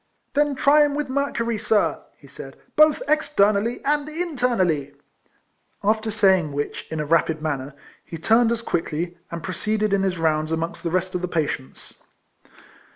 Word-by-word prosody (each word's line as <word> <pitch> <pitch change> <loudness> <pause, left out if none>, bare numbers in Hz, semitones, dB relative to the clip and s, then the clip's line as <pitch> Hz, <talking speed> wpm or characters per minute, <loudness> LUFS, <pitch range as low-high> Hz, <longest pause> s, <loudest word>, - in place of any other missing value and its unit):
"Then 290 0 +2
try 295 +2 +5
with 290 -1 -3
him - - -4
mercury, 235 -5 -1
sir," 215 0 +1 0.2
he - - -19
said, - - -11
" - - -38
both 305 +9 +5
externally 230 -7 +1
and 295 +1 0
internally" 240 - -1 0.9
After 220 +2 +1
saying 190 -7 +3
which 145 +1 -4
in 160 - -4
a 150 - -1
rapid 160 0 +2
manner, 140 -3 -4 0.3
he 165 - -8
turned 225 +7 +3
as 235 0 -2
quickly, 170 -1 -3
and 170 0 -6
proceeded 210 +3 -1
in 200 - +2
his 190 -2 0
rounds 155 -1 0
amongst 165 +1 -3
the 170 - -2
rest 185 +2 -1
of 180 - -2
the 180 - -2
patients. 150 -6 -4
200 Hz, 160 wpm, -23 LUFS, 165-250 Hz, 0.9 s, try